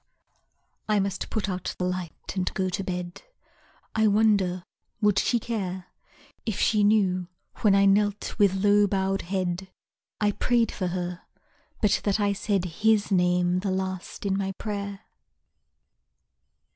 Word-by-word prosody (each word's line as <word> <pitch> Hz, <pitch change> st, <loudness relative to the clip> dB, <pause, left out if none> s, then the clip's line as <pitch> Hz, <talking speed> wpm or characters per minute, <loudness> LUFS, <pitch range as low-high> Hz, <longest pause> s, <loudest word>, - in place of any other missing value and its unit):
I 210 Hz, -1 st, +3 dB
must 195 Hz, -1 st, -2 dB
put 220 Hz, -2 st, -2 dB
out 185 Hz, -1 st, -3 dB
the -, -, -2 dB
light 180 Hz, -1 st, -5 dB
and 185 Hz, -1 st, 0 dB
go 190 Hz, -1 st, 0 dB
to 190 Hz, +2 st, -3 dB
bed; 180 Hz, -1 st, -5 dB, 0.7 s
I 220 Hz, 0 st, +3 dB
wonder 200 Hz, -4 st, +2 dB, 0.4 s
would 210 Hz, -2 st, +3 dB
she 240 Hz, -, +2 dB
care 190 Hz, -6 st, -4 dB, 0.5 s
If 220 Hz, -4 st, -3 dB
she 215 Hz, -2 st, +3 dB
knew, 190 Hz, -4 st, +2 dB, 0.3 s
when 205 Hz, -3 st, +4 dB
I 200 Hz, 0 st, +5 dB
knelt 205 Hz, +1 st, +2 dB
with 200 Hz, -2 st, +4 dB
low 205 Hz, 0 st, +5 dB
bowed 195 Hz, 0 st, 0 dB
head, 185 Hz, 0 st, -2 dB, 0.5 s
I 210 Hz, -1 st, +2 dB
prayed 235 Hz, +1 st, +1 dB
for 185 Hz, -, -3 dB
her, 180 Hz, 0 st, -3 dB, 0.6 s
but 210 Hz, -1 st, +3 dB
that 205 Hz, +1 st, +1 dB
I 205 Hz, -1 st, +2 dB
said 200 Hz, -2 st, -1 dB
His 210 Hz, +4 st, +1 dB
name 180 Hz, -1 st, +2 dB
the 195 Hz, +1 st, -2 dB
last 185 Hz, +1 st, -4 dB
in 195 Hz, -1 st, +1 dB
my 195 Hz, -1 st, -2 dB
prayer? 200 Hz, 0 st, -5 dB
195 Hz, 145 wpm, -26 LUFS, 185-205 Hz, 0.7 s, I